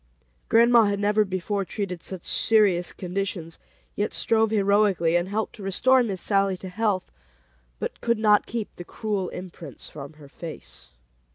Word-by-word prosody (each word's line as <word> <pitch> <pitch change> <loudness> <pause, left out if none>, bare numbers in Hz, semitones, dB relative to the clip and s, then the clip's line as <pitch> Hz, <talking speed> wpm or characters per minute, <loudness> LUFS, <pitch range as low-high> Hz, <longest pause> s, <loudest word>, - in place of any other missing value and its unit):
Grandma 235 0 +6
had 200 0 0
never 210 +1 +3
before 195 +1 -2
treated 185 -2 -5
such 185 -3 -5
serious 200 -6 +3
conditions, 180 -3 -5 0.4
yet 205 - -1
strove 225 -1 +2
heroically, 200 -5 +2
and 175 +2 +1
helped 215 +2 -2
to - - -12
restore 255 +7 +3
Miss 200 -6 -2
Sallie 195 0 +2
to 185 - -8
health, 200 -1 -1 0.7
but - - -5
could 235 -1 +1
not 210 -1 +3
keep 230 -2 -5
the 175 - -7
cruel 200 -1 -3
imprints 170 -6 -9
from 145 0 -9
her 150 -2 -15
face. 145 - -9
195 Hz, 155 wpm, -25 LUFS, 180-215 Hz, 0.7 s, Grandma